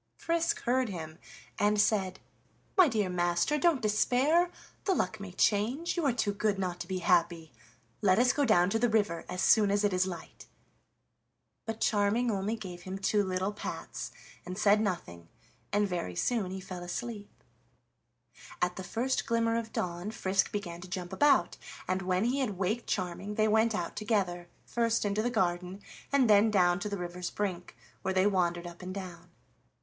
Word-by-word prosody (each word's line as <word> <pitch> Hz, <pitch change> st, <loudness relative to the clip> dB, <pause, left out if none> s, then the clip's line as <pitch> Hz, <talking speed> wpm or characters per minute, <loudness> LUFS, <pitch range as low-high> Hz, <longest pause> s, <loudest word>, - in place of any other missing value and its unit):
Frisk 335 Hz, 0 st, 0 dB
heard 255 Hz, 0 st, +1 dB
him 160 Hz, -4 st, -7 dB, 0.4 s
and 210 Hz, 0 st, +3 dB
said: 195 Hz, -3 st, +1 dB, 0.6 s
"My 370 Hz, -4 st, +7 dB
dear 215 Hz, -7 st, 0 dB
master, 175 Hz, +10 st, +1 dB
don't 320 Hz, -8 st, +2 dB
despair; 260 Hz, +11 st, +3 dB, 0.4 s
the 385 Hz, -, +2 dB
luck 205 Hz, -, -1 dB
may 200 Hz, -2 st, -7 dB
change, 225 Hz, -, +1 dB
you 345 Hz, -, -1 dB
are -, -, +4 dB
too 220 Hz, -4 st, 0 dB
good 205 Hz, 0 st, 0 dB
not 180 Hz, -2 st, -3 dB
to 175 Hz, -, -6 dB
be 190 Hz, 0 st, -2 dB
happy. 170 Hz, -4 st, +2 dB, 0.5 s
Let 190 Hz, -2 st, +4 dB
us 250 Hz, +2 st, +4 dB
go 290 Hz, -, +1 dB
down 195 Hz, -7 st, +4 dB
to 225 Hz, -, +1 dB
the 240 Hz, +1 st, +2 dB
river 205 Hz, -6 st, 0 dB
as 180 Hz, 0 st, -2 dB
soon 210 Hz, -2 st, +5 dB
as 205 Hz, +1 st, +1 dB
it 205 Hz, -2 st, +2 dB
is 185 Hz, +1 st, +2 dB
light." 175 Hz, -3 st, -9 dB, 1.2 s
But 225 Hz, 0 st, -4 dB
Charming 220 Hz, +3 st, +2 dB
only 200 Hz, +2 st, -1 dB
gave 180 Hz, -5 st, -8 dB
him 185 Hz, +2 st, -6 dB
two 205 Hz, +2 st, +2 dB
little 185 Hz, +1 st, -1 dB
pats -, -, -6 dB, 0.3 s
and 180 Hz, +1 st, -7 dB
said 210 Hz, 0 st, +4 dB
nothing, 85 Hz, -, -4 dB, 0.4 s
and 205 Hz, 0 st, +2 dB
very 170 Hz, -, -3 dB
soon 220 Hz, -, 0 dB
he 190 Hz, +1 st, -5 dB
fell 185 Hz, -1 st, -7 dB
asleep. 205 Hz, +4 st, -5 dB, 1.3 s
At 180 Hz, 0 st, 0 dB
the 190 Hz, -, -5 dB
first 245 Hz, +8 st, -1 dB
glimmer 230 Hz, 0 st, +1 dB
of 230 Hz, -1 st, -3 dB
dawn 175 Hz, +2 st, -3 dB
Frisk 195 Hz, -3 st, 0 dB
began 175 Hz, -5 st, -5 dB
to 185 Hz, -, -10 dB
jump 180 Hz, -1 st, -5 dB
about, 290 Hz, -2 st, +3 dB, 0.3 s
and 185 Hz, +1 st, 0 dB
when 185 Hz, +1 st, 0 dB
he 250 Hz, +4 st, +1 dB
had 220 Hz, -8 st, -1 dB
waked 205 Hz, +5 st, -1 dB
Charming 190 Hz, +2 st, -3 dB
they 215 Hz, 0 st, +3 dB
went 220 Hz, +1 st, +3 dB
out -, -, -3 dB
together, 195 Hz, -5 st, -1 dB, 0.2 s
first 230 Hz, -2 st, 0 dB
into 205 Hz, +1 st, 0 dB
the 240 Hz, -, 0 dB
garden, 180 Hz, -4 st, -1 dB, 0.3 s
and 275 Hz, -3 st, +4 dB
then 210 Hz, +1 st, +6 dB
down 180 Hz, -3 st, +3 dB
to 210 Hz, -, -3 dB
the 200 Hz, -, -3 dB
river's 175 Hz, 0 st, -4 dB
brink, 185 Hz, -4 st, -4 dB, 0.2 s
where 190 Hz, 0 st, -2 dB
they 185 Hz, +1 st, +4 dB
wandered 175 Hz, -3 st, +1 dB
up 175 Hz, +1 st, -9 dB
and 185 Hz, +1 st, -6 dB
down. 185 Hz, -3 st, -8 dB
200 Hz, 180 wpm, -30 LUFS, 180-225 Hz, 1.3 s, My